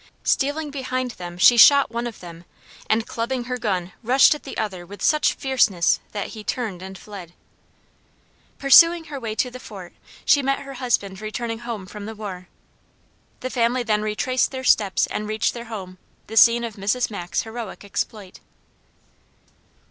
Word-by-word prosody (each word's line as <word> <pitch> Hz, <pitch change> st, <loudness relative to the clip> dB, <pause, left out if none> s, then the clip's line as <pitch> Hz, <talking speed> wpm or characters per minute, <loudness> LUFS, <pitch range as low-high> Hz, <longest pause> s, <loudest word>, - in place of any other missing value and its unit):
Stealing 290 Hz, +2 st, 0 dB
behind 255 Hz, -2 st, -3 dB
them 175 Hz, -4 st, -9 dB
she 240 Hz, +6 st, +6 dB
shot 280 Hz, +2 st, +7 dB
one 235 Hz, +1 st, -3 dB
of 230 Hz, -, -9 dB
them 170 Hz, -1 st, -11 dB, 0.5 s
and 220 Hz, +1 st, +2 dB
clubbing 240 Hz, +2 st, -3 dB
her 250 Hz, +1 st, -4 dB
gun 190 Hz, -6 st, -2 dB
rushed 250 Hz, +5 st, +5 dB
at 300 Hz, -, -8 dB
the 275 Hz, -, -9 dB
other 190 Hz, -5 st, -3 dB
with 200 Hz, +4 st, -11 dB
such 305 Hz, -1 st, +2 dB
fierceness 245 Hz, -, +2 dB
that 205 Hz, -1 st, -4 dB
he 215 Hz, -2 st, -9 dB
turned 210 Hz, -7 st, -3 dB
and 190 Hz, 0 st, -8 dB
fled. 190 Hz, -5 st, -11 dB, 1.2 s
Pursuing 335 Hz, +5 st, +6 dB
her 295 Hz, -3 st, -7 dB
way 225 Hz, -3 st, -4 dB
to 250 Hz, +2 st, -1 dB
the 255 Hz, -, -9 dB
fort 195 Hz, -7 st, -10 dB, 0.3 s
she 290 Hz, -2 st, +5 dB
met 275 Hz, 0 st, 0 dB
her 275 Hz, 0 st, -9 dB
husband 215 Hz, -7 st, -2 dB
returning 225 Hz, +1 st, -4 dB
home 230 Hz, -5 st, -6 dB
from 205 Hz, +2 st, -9 dB
the 220 Hz, -, -7 dB
war. 190 Hz, -4 st, -7 dB, 0.9 s
The 255 Hz, -, -4 dB
family 245 Hz, 0 st, +1 dB
then 215 Hz, -2 st, +1 dB
retraced 215 Hz, +4 st, 0 dB
their 260 Hz, -1 st, -6 dB
steps 205 Hz, -6 st, +3 dB
and 210 Hz, -, -4 dB
reached 215 Hz, 0 st, 0 dB
their 235 Hz, 0 st, -7 dB
home, 190 Hz, -5 st, -8 dB, 0.3 s
the 220 Hz, -, -9 dB
scene 235 Hz, +1 st, +6 dB
of 225 Hz, -3 st, -6 dB
Mrs. 215 Hz, +5 st, 0 dB
Mack's 175 Hz, -4 st, -3 dB
heroic 225 Hz, -2 st, -8 dB
exploit. 200 Hz, -1 st, -5 dB
225 Hz, 170 wpm, -22 LUFS, 200-255 Hz, 1.2 s, shot